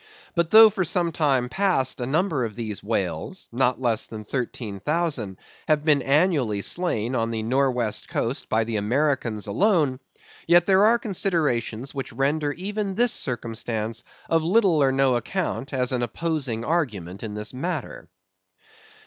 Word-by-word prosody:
But 170 -2 0
though 220 +1 +9
for 190 - -1
some 175 0 +1
time 140 -6 +1
past 135 -5 0
a 120 - -2
number 155 -1 0
of 110 -3 -4
these 110 -4 -4
whales, 110 - -3
not 125 +1 +1
less 120 -4 0
than 110 -1 -8
13,000, 120 - -3 0.3
have 150 -1 +2
been 150 -3 +4
annually 140 - +2
slain 130 -10 0
on 115 -2 0
the 110 -1 -3
nor' 135 +4 +2
west 120 -4 -2
coast 120 +4 -3
by 110 +1 +2
the 110 -1 -3
Americans 120 -1 0
alone; 140 - +1 0.5
yet 175 +1 +5
there 195 +1 +5
are 230 +2 +5
considerations 150 - -1
which 135 -3 -5
render 145 +4 0
even 200 +2 -3
this 240 +2 +3
circumstance 115 -2 -3 0.2
of 165 0 +2
little 180 -3 +3
or 135 -1 +4
no 135 -1 +2
account 135 - -3
as 125 -2 0
an 125 -1 0
opposing 130 -3 -2
argument 105 - -2
in 105 -2 -6
this 105 +2 -3
matter. 160 +5 -5
135 Hz, 155 wpm, -24 LUFS, 115-170 Hz, 0.5 s, though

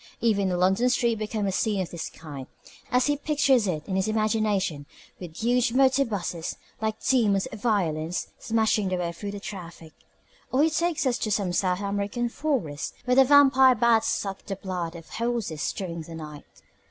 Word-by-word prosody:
Even 200 -4 +1
a 180 - 0
London 190 +7 +3
street 235 -3 +1
becomes 215 -2 -2
a - - -1
scene 205 +1 0
of 185 - -3
this 170 - -5
kind 145 -5 -9 0.4
as 250 0 +3
he 290 0 +1
pictures 275 -6 +2
it 155 -4 -3
in 190 - -2
his 190 +1 +1
imagination 210 -8 0 0.3
with 170 -2 -9
huge 240 0 +1
motorbuses, 235 -11 +1 0.2
like 220 0 -3
demons 210 -7 +3
of 220 - -9
violence, 175 -7 -1
smashing 220 -3 +1
their 185 - -1
way 175 -1 -2
through 200 +4 -7
the 200 0 -6
traffic. 170 -6 -9 0.6
Or 265 +3 +3
he 320 - +3
takes 335 -1 0
us 250 -2 +1
to 215 - -2
some 195 -4 0
South 180 +1 0
American 205 +4 -2
forest, 230 - -2
where 250 - +2
the 270 - +8
vampire 265 -2 +6
bats 230 0 +3
suck 195 -1 -2
the 195 - -4
blood 180 -3 -4
of 165 -1 -10
horses 230 -9 -2
during 170 -4 -5
the 165 +1 -9
night. 150 -2 -9
205 Hz, 180 wpm, -26 LUFS, 180-240 Hz, 0.6 s, the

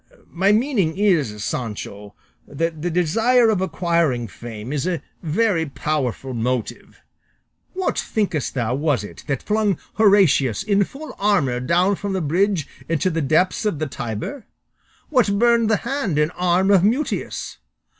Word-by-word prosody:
My 190 +4 +2
meaning 210 - +1
is, 155 - +1
Sancho, 105 -3 -5 0.3
that 160 +1 -3
the 175 - -1
desire 225 +8 +3
of 200 -4 0
acquiring 170 -8 0
fame 115 +4 -8
is 150 +3 -1
a 175 -3 -2 0.2
very 170 0 +1
powerful 135 -3 -2
motive. 120 0 -3 0.7
What, 375 -1 -1
thinkest 185 - -2
thou, 120 -2 0
was 140 -3 0
it 105 - -10
that 140 -3 -2
flung 210 -4 +1 0.2
Horatius 190 - +4
in 200 -1 +2
full 305 +8 -10
armour 170 -12 +2
down 175 +9 +2
from 200 -1 -3
the 190 - 0
bridge 175 +1 +1 0.2
into 165 +3 +1
the 165 0 -1
depths 155 +9 +2
of 210 -7 0
the 155 - -2
Tiber? 130 - -5 0.6
What 240 -8 +2
burned 235 0 +3
the 220 - +3
hand 250 - -1
and 150 +2 +2
arm 180 +2 +2
of 190 -3 +5
Mutius? 245 +9 -1
175 Hz, 145 wpm, -21 LUFS, 140-205 Hz, 0.7 s, of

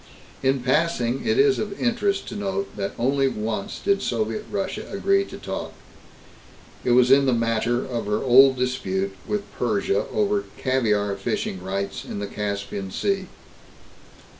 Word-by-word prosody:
In 135 0 +2
passing, 135 - +1
it 220 - +2
is 410 -1 +4
of 205 -2 -4
interest 210 -5 0
to - - -7
note 195 -1 -3
that 100 -1 -3
only 135 +3 +2
once 110 -4 -3
did 200 0 +1
Soviet 215 0 -2
Russia 195 -2 -3
agree 195 0 +2
to - - -9
toss. 95 - -5 1.1
It 125 - +3
was 125 +1 +5
in 135 0 +6
the 130 - +3
matter 115 +1 +1
of 120 -4 -4
her 105 0 +1
old 130 +2 +6
dispute 100 -7 -1
with 210 -1 -1 0.2
Persia 105 -4 +1
over 205 -1 +1
caviar 105 -6 +1
fishing 95 -1 -2
rights 100 +1 -3
in - - -6
the 100 - -3
Caspian 100 -1 -4
Sea. 195 - -1
130 Hz, 150 wpm, -24 LUFS, -, 1.1 s, in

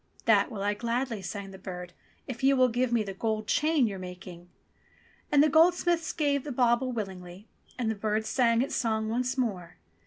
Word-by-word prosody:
"That 205 -3 +4
will 205 -5 -5
I 205 +1 +1
gladly," 235 0 -2
sang 195 +2 -6
the 190 - -11
bird, 180 -2 -7 0.3
"if 245 -2 -7
you 275 +1 +5
will 255 0 +5
give 245 +1 0
me 235 -2 +2
the 195 -2 -6
gold 215 +2 -2
chain 300 +3 +2
you're 200 -4 -4
making." 180 -1 -10 0.8
And 290 -1 +6
the - - +5
goldsmith 335 +2 +3
gave 285 -3 +1
the 295 - -5
bauble 245 0 +2
willingly, 190 -3 -7 0.3
and 235 -3 0
the - - -1
bird 215 +1 -1
sang 230 0 +2
its 275 - -4
song 220 -2 0
once 250 +3 -1
more. 195 -9 -2
230 Hz, 190 wpm, -28 LUFS, 200-255 Hz, 0.8 s, And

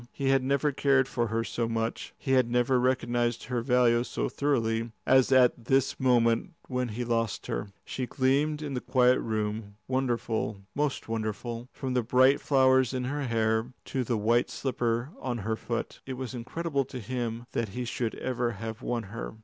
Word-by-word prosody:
He 135 -1 -1
had 135 -1 +4
never 140 +2 +1
cared 135 -1 +3
for 120 -3 -1
her 115 +1 -1
so 115 0 -2
much, 115 0 -3
he 135 - -3
had 130 -3 +4
never 125 +1 +2
recognised 120 -2 +1
her 125 0 -2
value 120 -1 +3
so - - -2
thoroughly, 115 -5 0
as 130 0 +5
at 125 -3 +4
this 135 +1 +2
moment 120 +4 +2
when 125 -1 -1
he 120 +2 -4
lost 115 -2 -1
her. - - -3 0.2
She 130 -1 -3
gleamed 145 +4 +1
in 145 -2 -4
the 125 - -2
quiet 125 -1 +4
room, 105 -1 -3
wonderful, 120 -5 -1
most 145 -2 -1
wonderful, 115 +2 -4
from 130 -2 -4
the 125 - +2
bright 130 +4 +4
flowers 130 -2 +4
in 125 - -1
her 140 +2 -2
hair 110 +1 0
to 130 -2 -1
the 120 -1 -1
white 115 +3 +2
slipper 120 0 -1
on 125 -2 -2
her 110 0 0
foot. 115 +1 -4
It 130 - -3
was 130 -1 -5
incredible 140 +4 -2
to 130 0 -7
him 120 0 -3
that 115 -3 -1
he 125 +5 -4
should 115 -1 -2
ever 125 -2 -1
have 110 +2 -6
won 120 -3 -2
her. 110 +2 -7
125 Hz, 180 wpm, -28 LUFS, 115-130 Hz, 0.2 s, as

